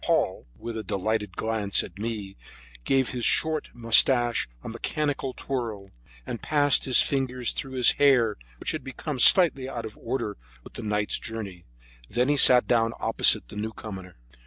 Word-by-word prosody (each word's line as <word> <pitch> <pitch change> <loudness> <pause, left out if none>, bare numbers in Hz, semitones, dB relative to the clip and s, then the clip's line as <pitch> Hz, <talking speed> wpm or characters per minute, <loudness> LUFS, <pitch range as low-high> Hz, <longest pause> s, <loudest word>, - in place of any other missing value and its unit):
Paul, - - -1
with 115 0 -7
a - - -6
delighted 105 -1 -3
glance 110 -3 +1
at 90 +2 -12
me, 105 -3 -5 0.5
gave 135 -2 +1
his 125 -2 -5
short 155 +3 +1
mustache 120 - +3
a - - -8
mechanical 135 +3 -3
twirl, 110 -7 -5 0.3
and 115 - -6
passed 145 -2 +2
his 130 - +5
fingers 130 -3 -1
through 135 -1 -6
his, 125 -2 +5
hair, 125 -7 +3 0.2
which - - -3
had - - -6
become 135 +1 -6
slightly 140 -3 +4
out 115 -3 -6
of 110 - -9
order 115 -6 -4 0.3
with - - -14
the - - -7
night's 105 -1 -2
journey. 100 -6 -8 0.4
Then 125 +3 0
he 145 - +2
sat 125 -2 +7
down 115 -1 +1
opposite 115 - +4
the - - -11
newcomer. 105 -4 -7
115 Hz, 160 wpm, -25 LUFS, 105-130 Hz, 0.5 s, sat